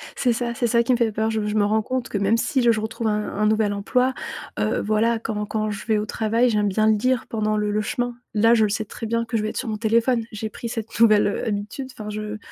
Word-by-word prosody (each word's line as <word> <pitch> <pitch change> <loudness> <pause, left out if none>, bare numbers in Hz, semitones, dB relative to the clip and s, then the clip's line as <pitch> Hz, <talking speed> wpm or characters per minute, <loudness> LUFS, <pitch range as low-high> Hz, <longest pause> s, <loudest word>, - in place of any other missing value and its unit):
C'est 245 -2 +2
ça! 235 0 -2
C'est 240 -1 0
ça 235 +1 +3
qui 235 - 0
me 245 - +4
fait 230 -2 +1
peur. 220 +1 0
Je 220 -1 -1
je 210 0 -2
me 205 -1 +3
rends 215 +1 +2
compte 255 +1 -3
que - - -2
même 200 +3 +2
si 260 +3 0
je 235 -1 +5
je 215 - 0
retrouve 220 +1 -3
un 210 0 0
un 210 - +1
nouvel 215 -1 +2
emploi, 250 +6 +1 0.5
heu, - - +1
voilà, 220 +2 +1
quand 210 -2 -3
quand 215 0 -2
je 200 - -6
vais 220 -1 +2
au 210 - -1
travail, 225 +3 +1
j'aime 210 -2 +1
bien 215 +2 +2
lire 240 +3 +1
pendant 215 -1 -1
le 210 0 0
le 210 - +1
chemin. 245 +2 -2 0.2
Là, 225 +2 +4
je 220 - +4
le 210 - +2
sais 215 +1 -2
très 225 - -7
bien 230 +1 0
que 230 0 -2
je 215 - -1
vais 215 - -1
être - - -6
sur 250 - -3
mon 215 - -2
téléphone. 230 +2 +2
J'ai 215 0 -4
pris 235 - -6
cette 225 0 -5
nouvelle, 215 -3 +6
heu, - - -2
habitude. 210 +6 -4
Enfin, 210 -4 -8
je 215 0 -5
220 Hz, 285 wpm, -23 LUFS, 210-235 Hz, 0.5 s, nouvelle